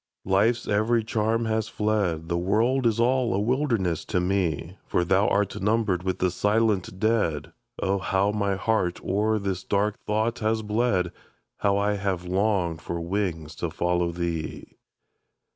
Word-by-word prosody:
Life's 110 +5 +2
every 110 +3 +2
charm 110 +1 0
has 110 -1 0
fled, 100 -7 -1
The 85 - -1
world 115 +8 +2
is 115 0 0
all 125 -2 +2
a - - +1
wilderness 115 - 0
to 90 - 0
me; 90 -1 -1
"For 90 - +1
thou 95 +3 +3
art 100 -2 0
numbered 105 -3 +1
with 95 0 -2
the 90 -1 +1
silent 105 -1 +1
dead." 105 -9 0 0.3
Oh, 100 +1 +1
how 95 +1 +1
my 100 -2 0
heart 95 -2 0
o'er 105 +3 +1
this 100 -3 -3
dark 105 +1 -1
thought 110 +2 0
has 110 0 0
bled! 105 -5 +1 0.5
How 100 0 +2
I 105 0 +1
have 95 -3 -2
longed 90 -3 0
for 85 +2 -4
wings 85 -3 -2
to 85 - -2
follow 85 +1 0
thee! 85 -2 -4
100 Hz, 155 wpm, -26 LUFS, 90-110 Hz, 0.5 s, thou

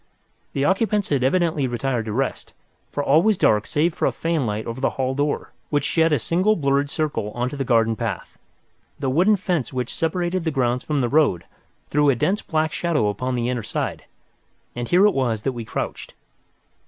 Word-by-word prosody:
The 140 - 0
occupants 205 +2 +1
had 140 -3 +1
evidently 155 -1 +1
retired 120 -1 -2
to 110 - -4
rest, 135 +5 -2 0.4
for 145 - -2
all 150 +4 +5
was 215 +1 +2
dark 105 -9 +3
save 160 +3 +1
for - - 0
a - - +1
fanlight 130 -11 -1
over 115 +3 -5
the - - +2
hall 130 0 0
door, 145 +2 -2 0.2
which 145 -2 +1
shed 165 -1 +2
a 150 - +4
single 185 +9 +2
blurred 140 -3 +1
circle 150 -9 -2
on 120 +1 -1
to 145 - -7
the 140 - -2
garden 115 -3 +2
path. 110 -4 -4 0.6
The 135 -2 -1
wooden 185 +9 +4
fence 180 - -2
which 125 -2 -3
separated 175 +2 -1
the 160 - 0
grounds 125 -4 0
from 150 -3 -1
the 120 - +1
road 140 - +2 0.4
threw 145 0 +3
a 135 - +4
dense 195 - 0
black 155 -1 0
shadow 155 -12 +1
upon 125 +5 -2
the 120 -1 -1
inner 125 -1 -1
side, - - -4 0.7
and 120 0 -4
here 180 +3 +5
it 210 - +4
was 115 -5 -1
that 135 - 0
we 120 -2 -6
crouched. - - -5
140 Hz, 200 wpm, -22 LUFS, 120-165 Hz, 0.7 s, all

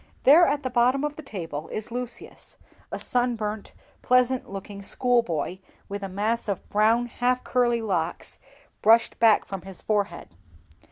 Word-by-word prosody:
There, 320 +6 +7
at 290 +1 0
the 255 - -3
bottom 250 +3 +2
of 295 0 -2
the 310 - -8
table, 165 - -6
is 215 +1 -6
Lucius, 245 0 -7 0.3
a - - -3
sunburnt, 220 -4 -2 0.3
pleasant 250 0 +2
looking 200 +1 -7
schoolboy, 200 - 0 0.3
with 200 0 -5
a 195 - -5
mass 215 +5 -1
of 200 -3 -3
brown, 220 +3 +3
half 245 +1 -1
curly 240 -2 +1
locks 180 -7 -3 0.4
brushed 225 +2 +4
back 225 -2 +5
from 195 -2 -6
his 190 -1 -12
forehead. 205 -5 -1
225 Hz, 150 wpm, -25 LUFS, 200-250 Hz, 0.4 s, There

